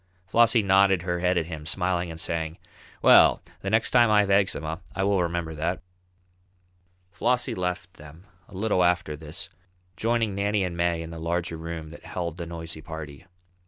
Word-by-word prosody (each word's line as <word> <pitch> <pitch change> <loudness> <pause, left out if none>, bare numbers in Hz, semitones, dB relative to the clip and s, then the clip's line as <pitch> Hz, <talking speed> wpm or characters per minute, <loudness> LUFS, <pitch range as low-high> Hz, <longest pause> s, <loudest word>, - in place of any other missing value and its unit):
Flossie 115 +3 +4
nodded 95 -2 +4
her 90 -1 -1
head 90 0 +1
at 85 - +1
him, 80 -3 -7
smiling 90 +1 -1
and 80 0 -8
saying: 80 -1 -3 0.5
"Well, - - +7 0.2
the 95 - -4
next 110 +2 +2
time 120 -2 +5
I 105 -1 +5
have 100 -1 -1
eczema 90 -4 +1
I 95 - 0
will 100 -1 +2
remember 85 -2 -2
that." 80 +5 -2 1.3
Flossie 125 +4 0
left 90 -1 -4
them 75 +3 -13 0.2
a - - -14
little 100 -2 +1
after 90 -3 +1
this, 80 +4 -8 0.5
joining 115 -1 0
Nannie 100 +1 0
and 90 -2 -3
May 85 -1 0
in 80 - -8
the 85 - -7
larger 85 +1 -2
room 80 -1 -6
that 85 - -11
held 85 -2 -4
the 85 -1 -5
noisy 80 -1 -6
party. 80 0 -9
85 Hz, 175 wpm, -26 LUFS, 80-95 Hz, 1.3 s, Well